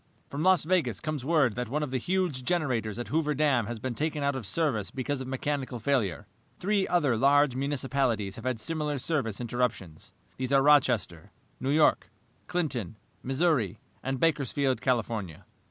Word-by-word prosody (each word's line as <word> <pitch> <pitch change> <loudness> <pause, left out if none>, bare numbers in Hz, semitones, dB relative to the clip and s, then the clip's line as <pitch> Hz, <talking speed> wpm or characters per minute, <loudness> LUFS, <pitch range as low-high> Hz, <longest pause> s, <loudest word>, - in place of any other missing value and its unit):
"From 140 - -3
Las 185 +1 +4
Vegas 155 - +1
comes 155 -4 -3
word 145 -6 +3
that 125 0 -4
one 150 +4 -1
of 145 - -4
the 130 - 0
huge 175 -4 -1
generators 125 - -1
at 120 - -5
Hoover 150 -1 +1
Dam 135 -6 +2
has 120 0 -4
been 125 +3 -4
taken 150 +2 -2
out 140 -1 +1
of 120 -6 -5
service 135 -11 0
because 135 +1 -3
of 130 - -6
mechanical 130 -1 -2
failure. 115 -7 0 0.3
Three 200 0 +1
other 150 -9 +2
large 140 +2 +4
municipalities 130 -7 -1
have 115 - -10
had 130 -3 -1
similar 150 +3 -2
service 130 -7 -2
interruptions. 120 -9 -3 0.3
These 130 0 -3
are 135 -1 +5
Rochester, 120 - +3 0.3
New 130 - -2
York, 150 -9 +3 0.4
Clinton, 130 - -2 0.2
Missouri, 135 - +1 0.2
and 135 0 -3
Bakersfield, 140 -5 +1
California. 115 - -2
135 Hz, 165 wpm, -28 LUFS, 120-150 Hz, 0.4 s, are